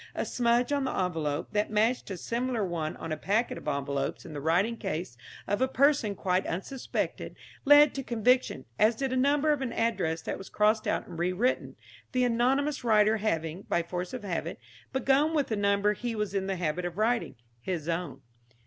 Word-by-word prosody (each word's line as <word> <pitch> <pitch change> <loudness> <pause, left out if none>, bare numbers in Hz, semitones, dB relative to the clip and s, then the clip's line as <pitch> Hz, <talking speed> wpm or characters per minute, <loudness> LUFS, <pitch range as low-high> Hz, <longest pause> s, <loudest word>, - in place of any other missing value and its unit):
A - - -1
smudge 240 +1 +1
on 285 -1 +1
the - - -1
envelope, 160 -5 -2
that 210 0 0
matched 220 +3 +1
a 190 - -4
similar 235 +2 -1
one 165 -3 -3
on 165 - -6
a 155 - -1
packet 210 +9 0
of - - -13
envelopes 140 -1 -2
in 160 - -9
the 145 - -5
writing 180 +9 +2
case 180 - -4 0.3
of 205 - -1
a 260 - +4
person 265 -6 +2
quite 185 0 0
unsuspected, 195 +10 -3 0.3
led 290 +1 +7
to 275 - -3
conviction, 245 - +1
as 220 +2 +4
did 265 +2 -2
a - - +1
number 285 +3 +3
of 290 - -3
an 255 -3 -2
address 180 -10 -1
that - - -4
was 195 - -9
crossed 215 +1 +2
out - - 0
and 165 - -8
rewritten, 185 +9 0 0.4
the 255 0 +2
anonymous 260 +4 +1
writer 215 -1 +4
having, 165 -5 -2
by 170 - +1
force 175 +1 -4
of 255 -4 -6
habit, 170 -3 -3 0.3
begun 275 +4 +2
with 290 -3 +1
the 220 - 0
number 200 0 +2
he 235 +2 -4
was 210 -2 -2
in 195 -1 -1
the 195 - -1
habit 175 0 -2
of 175 0 -4
writing 230 +2 0 0.3
his 165 +2 -3
own. 170 -4 -3
210 Hz, 195 wpm, -29 LUFS, 175-250 Hz, 0.4 s, led